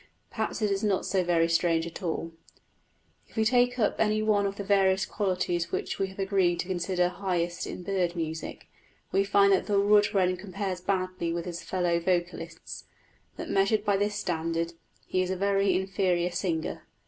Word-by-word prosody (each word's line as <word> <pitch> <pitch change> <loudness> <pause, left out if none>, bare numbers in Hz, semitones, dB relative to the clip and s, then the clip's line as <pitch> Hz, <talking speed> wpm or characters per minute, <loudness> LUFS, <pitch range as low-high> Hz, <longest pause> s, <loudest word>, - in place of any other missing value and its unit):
Perhaps 220 -1 -2
it 210 - +2
is 195 +1 -1
not 200 -3 +1
so 190 -2 +1
very 170 -1 +2
strange 165 0 +2
after 170 +2 -6
all. 165 0 -3 1.0
If - - -22
we 220 -1 +2
take 245 +1 +3
any 215 -1 +1
one 205 -2 +2
of 195 - -4
the 200 - -5
various 195 -1 +3
qualities 180 -4 -1
which - - -3
we 195 - +1
have 190 - -12
agreed 190 -3 +1
to - - -8
consider 180 -1 0
highest 175 -3 -2
in 180 - -6
bird 180 -2 0
music, 160 -1 -5 0.4
we 195 - +3
find 200 0 +4
that 190 - +1
the 205 -2 +3
wood 205 +1 +4
wren 185 -2 +2
compares 190 -1 -4
badly 185 -2 -1
with 170 0 -3
his 170 -2 -5
fellow 175 -2 0
vocalists 175 0 -3 0.5
that, - - -5
measured 200 +2 +2
by 205 -2 +3
this 205 +1 0
standard, 165 -2 -2 0.3
he 185 - 0
is 185 - -1
a 190 - 0
very 195 0 +2
inferior 185 -2 0
singer. 170 -2 -2
190 Hz, 180 wpm, -28 LUFS, 175-200 Hz, 1.0 s, find